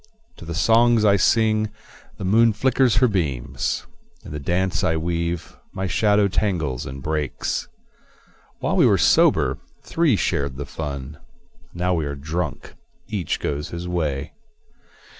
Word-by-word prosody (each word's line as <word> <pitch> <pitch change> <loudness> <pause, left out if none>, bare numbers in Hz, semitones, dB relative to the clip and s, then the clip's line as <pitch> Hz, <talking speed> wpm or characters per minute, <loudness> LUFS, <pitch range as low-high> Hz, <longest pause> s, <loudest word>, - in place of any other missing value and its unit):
To - - -11
the 85 0 -5
songs 115 +3 +4
I 100 -1 +5
sing 110 +2 +2 0.5
the 95 - -5
moon 115 +4 +4
flickers 130 +2 +2
her 125 +3 +4
beams; 70 - -2 0.4
In - - -9
the 75 - -4
dance 90 +5 0
I 80 - +1
weave 85 +1 -3 0.2
my 95 0 -3
shadow 105 +1 +3
tangles 85 - -1
and 65 +1 -8
breaks. 75 -3 -2 0.9
While - - 0
we - - +6
were - - +4
sober, - - +3 0.2
three 160 -8 +2
shared 70 -8 -1
the 70 - -4
fun; 70 -2 -6 0.6
Now 90 +1 0
we 80 -4 -1
are 70 - -4
drunk, 80 +6 -4 0.4
each 100 -7 -2
goes 75 0 -3
his 85 +1 -6
way. 75 -5 -2
85 Hz, 140 wpm, -22 LUFS, 75-105 Hz, 0.9 s, we